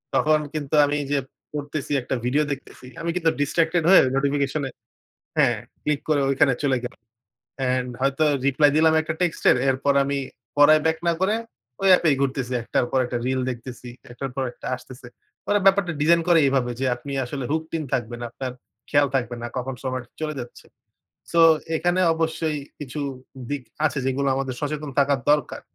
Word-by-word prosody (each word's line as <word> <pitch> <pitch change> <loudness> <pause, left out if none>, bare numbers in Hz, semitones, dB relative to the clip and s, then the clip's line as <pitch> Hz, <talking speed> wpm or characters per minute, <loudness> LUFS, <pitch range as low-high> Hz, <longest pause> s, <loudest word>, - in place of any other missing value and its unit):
তখন 155 0 +3
কিন্তু 150 -1 -2
আমি 145 +1 -1
যে 145 - +2 0.3
পড়তেছি 145 0 -4
একটা 125 - -3
ভিডিও 145 +5 +2
দেখতেছি, 135 -2 -8 0.2
আমি 170 - -2
কিন্তু 165 -3 +2
distracted 165 +3 +1
হয়ে 195 - +9
নোটিফিকেশনে 140 0 0 0.7
হ্যাঁ, - - +3 0.3
ক্লিক 150 -1 0
করে 150 -2 +3
ঐখানে 135 0 +3
চলে 135 -2 +2
গেলো। 125 - -6 0.6
অ্যান্ড 125 -1 0
হয়তো 140 +3 +2 0.2
রিপ্লাই 145 +2 +4
দিলাম 160 0 +5
একটা 160 0 -3
টেক্সটের 175 -7 +3
এরপর 135 +2 +1
আমি 140 0 -1 0.4
পড়ায় 155 +1 +7
ব্যাক 160 0 +2
না 170 - +4
করে 200 +3 +2 0.5
ওই 195 - +2
এপে 170 - 0
এই 135 - +1
ঘুরতেছি। 130 -2 -1
একটার 120 - 0
পর 130 - +2
একটা 120 0 -3
রিল 130 0 0
দেখতেছি, 125 0 -7 0.2
একটার 135 +3 -5
পর 135 - -1
একটা - - -9
আসতেছে। 125 0 -12 0.4
ওরা 205 0 +3
ব্যাপারটা 195 -3 +4
ডিজাইন 170 +2 +4
করে 170 -2 +6
এভাবে 130 -3 +1
যে 135 - 0
আপনি 120 +3 -9
আসলে 135 +1 -5
hooked 160 +1 -2
in 155 - -3
থাকবেন, 120 -2 -2
আপনার 130 +2 -5 0.4
খেয়াল 145 -1 +4
থাকবে 120 -2 -1
না 120 - -4
কখন 130 +1 -3
সময়টা 130 -2 -4
চলে 155 -1 -2
যাচ্ছে। 120 -1 -9 0.7
সো 170 - +4 0.4
এখানে 175 +3 +1
অবশ্যই 160 -1 -1 0.2
কিছু 145 0 -6 0.5
দিক 145 -2 -2 0.2
আছে 145 - -2
যেগুলো 135 +1 0
আমাদের 135 -1 -2
সচেতন 150 0 -3
থাকার 140 -1 +3
দরকার। 150 0 +1
140 Hz, 170 wpm, -23 LUFS, 130-155 Hz, 0.7 s, হয়ে